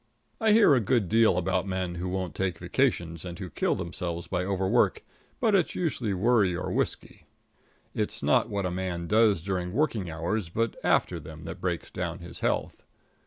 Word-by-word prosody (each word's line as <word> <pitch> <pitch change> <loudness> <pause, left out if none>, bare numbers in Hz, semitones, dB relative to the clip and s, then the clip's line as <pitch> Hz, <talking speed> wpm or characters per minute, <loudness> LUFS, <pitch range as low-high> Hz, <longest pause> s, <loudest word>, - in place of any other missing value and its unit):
I 220 -2 +3
hear 210 -7 +6
a 130 - +5
good 115 -1 +1
deal 110 -4 +4
about 90 +1 0
men 95 -2 -2
who 90 +1 -4
won't 95 -3 -3
take 95 -1 -2
vacations, 85 -1 0
and 85 -2 -7
who 90 -3 -7
kill - - 0
themselves 85 0 -4
by 90 +1 -2
overwork, 100 - +1 0.4
but 225 -4 +2
it's 185 -4 +2
usually 130 - -1
worry 100 -2 +3
or 90 - -3
whiskey. - - -3 0.7
It's - - -2
not - - +3
what 100 -2 -2
a 90 - -1
man 90 -2 -3
does 105 -3 +3
during 90 -2 -2
working 115 - 0
hours, 85 +4 -2
but 115 +6 -1
after - - +2
them, - - -10
that - - -7
breaks - - -2
down 85 -2 -3
his 85 -2 -10
health. - - -1
95 Hz, 180 wpm, -28 LUFS, 85-110 Hz, 0.7 s, hear